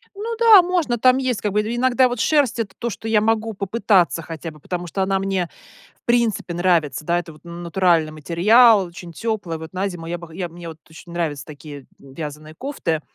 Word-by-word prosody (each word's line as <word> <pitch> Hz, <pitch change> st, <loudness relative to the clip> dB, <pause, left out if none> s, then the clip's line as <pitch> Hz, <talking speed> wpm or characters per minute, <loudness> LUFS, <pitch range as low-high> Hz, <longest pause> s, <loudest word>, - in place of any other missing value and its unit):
Ну 450 Hz, +3 st, -4 dB
да, 450 Hz, -4 st, +8 dB
можно, 345 Hz, -9 st, 0 dB
там 255 Hz, +3 st, +4 dB
есть 255 Hz, -5 st, -1 dB
как 205 Hz, -2 st, -2 dB
бы, 210 Hz, -, +3 dB
и 220 Hz, +3 st, -3 dB
иногда 255 Hz, +1 st, +3 dB
вот 245 Hz, -1 st, -4 dB
шерсть- 280 Hz, -2 st, +2 dB
это 205 Hz, -4 st, -3 dB
то, 235 Hz, -, -3 dB
что 225 Hz, -, -7 dB
я 220 Hz, -1 st, +3 dB
могу 225 Hz, +1 st, 0 dB
попытаться 195 Hz, -4 st, +1 dB
хотя 165 Hz, 0 st, -7 dB
бы, 155 Hz, -, -16 dB
потому 175 Hz, +3 st, -5 dB
что 195 Hz, -, -3 dB
она 190 Hz, 0 st, +1 dB
мне 190 Hz, -3 st, -1 dB, 0.5 s
в -, -, -39 dB
принципе 235 Hz, -6 st, +1 dB
нравится, 170 Hz, -5 st, +1 dB
да, 175 Hz, +1 st, +1 dB
это 170 Hz, -2 st, -8 dB
вот 150 Hz, -, -19 dB
натуральный 170 Hz, -1 st, +1 dB
материал, 195 Hz, -, +4 dB
очень 170 Hz, 0 st, -11 dB
теплая, 205 Hz, -4 st, -3 dB
вот 160 Hz, 0 st, -9 dB
на 190 Hz, +2 st, -1 dB
зиму 175 Hz, -3 st, -7 dB
я 175 Hz, +1 st, -3 dB
бы 170 Hz, 0 st, -11 dB
хо 160 Hz, -, -15 dB
я 175 Hz, 0 st, -4 dB
б -, -, -19 dB
мне 175 Hz, -1 st, -9 dB
вот 160 Hz, -1 st, -9 dB
очень 165 Hz, +2 st, -13 dB
нравятся 150 Hz, -5 st, -3 dB
такие, 145 Hz, -2 st, -10 dB
м, 135 Hz, -1 st, -15 dB
вязаные 155 Hz, +1 st, -8 dB
кофты. 170 Hz, -, -3 dB
185 Hz, 225 wpm, -21 LUFS, 165-225 Hz, 0.5 s, да